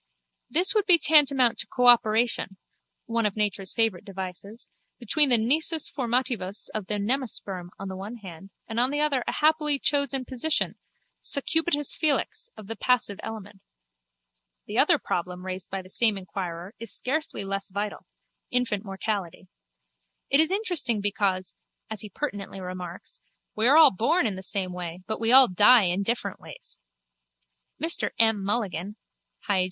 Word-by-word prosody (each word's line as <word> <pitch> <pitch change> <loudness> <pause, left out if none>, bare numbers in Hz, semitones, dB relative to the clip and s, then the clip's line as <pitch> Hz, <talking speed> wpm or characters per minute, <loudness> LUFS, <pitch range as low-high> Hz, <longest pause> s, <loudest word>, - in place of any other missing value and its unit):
This 360 +5 +2
would 425 -3 +1
be 355 -3 +8
tantamount 275 -6 +4
to - - -1
a - - -18
cooperation 235 -4 +3 0.5
(one 230 -1 0
of 200 - -5
nature's 205 -3 -1
favourite 225 -6 0
devices) 195 +2 -8 0.3
between 275 +5 +4
the 245 - +6
nisus 305 +7 +1
formativus 240 -6 -1
of 215 -3 -4
the 210 - -1
nemasperm 205 -5 -2
on 195 - -7
the 190 - -6
one 200 +5 -7
hand 195 -4 -11 0.2
and 225 +1 -3
on 250 +2 +3
the 290 +1 -2
other 285 -4 +1
a - - 0
happily 300 -1 +2
chosen 275 -2 0
position, 260 +6 -1 0.4
succubitus 295 0 +1
felix, 310 - -1
of 215 - -10
the 225 +3 -6
passive 225 -6 0
element. 205 -3 -9 1.0
The - - -2
other - - +5
problem 180 +1 -4
raised 185 -1 -6
by 190 -1 -5
the - - -15
same 215 0 +3
inquirer 180 0 -6
is 230 -2 -6
scarcely 300 -5 -2
less 195 +1 -3
vital: 205 +2 -5 0.4
infant 240 -5 -1
mortality. 195 -3 -5 0.8
It 275 - +5
is 320 0 +4
interesting 355 - 0
because, 195 -3 -1 0.4
as 220 - -3
he 210 - -7
pertinently 200 -5 -5
remarks, 180 -1 -8 0.3
we 220 +2 +2
are 285 +4 +6
all 320 - +8
born 235 - +1
in 210 -4 -1
the 190 - -7
same 190 -1 -1
way 180 0 -7
but 220 - -3
we 225 +1 +1
all 260 0 +9
die 210 +5 +6
in 180 +1 0
different 235 +4 -2
ways. - - -9 1.0
Mr 325 +3 +1
M. 225 -3 +3
Mulligan 200 -2 -2 0.5
(Hyg. 200 -2 +2
220 Hz, 155 wpm, -26 LUFS, 195-265 Hz, 1.0 s, all